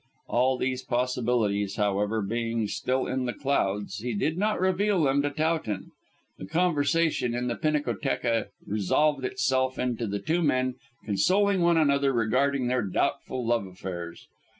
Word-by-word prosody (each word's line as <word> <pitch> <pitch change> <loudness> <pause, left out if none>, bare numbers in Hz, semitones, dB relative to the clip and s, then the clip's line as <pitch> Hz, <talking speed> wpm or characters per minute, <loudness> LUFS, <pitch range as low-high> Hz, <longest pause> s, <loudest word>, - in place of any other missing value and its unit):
All 130 +2 +2
these 130 0 -1
possibilities, 120 -5 0
however, 105 +1 0
being 115 +1 -1
still 130 +5 -1
in 130 -1 -2
the 120 - -2
clouds, 105 -8 -1
he 120 +1 -3
did 155 +10 0
not 210 +4 0
reveal 190 0 +2
them 140 0 +3
to 145 - 0
Towton. 155 - -2 0.5
The 95 - -7
conversation 160 - +1
in 125 0 -2
the 120 - -1
pinacotheca 140 -6 0 0.2
resolved 135 +8 +1
itself 130 0 0
into 120 -2 -1
the 100 0 -2
two 160 +10 0
men 130 -4 +1 0.3
consoling 185 - +2
one 170 -1 +4
another 140 -3 +3
regarding 130 +3 +1
their 125 0 +1
doubtful 120 +5 -1
love 115 -4 +1
affairs. 90 -2 -7
130 Hz, 145 wpm, -27 LUFS, 110-145 Hz, 0.5 s, one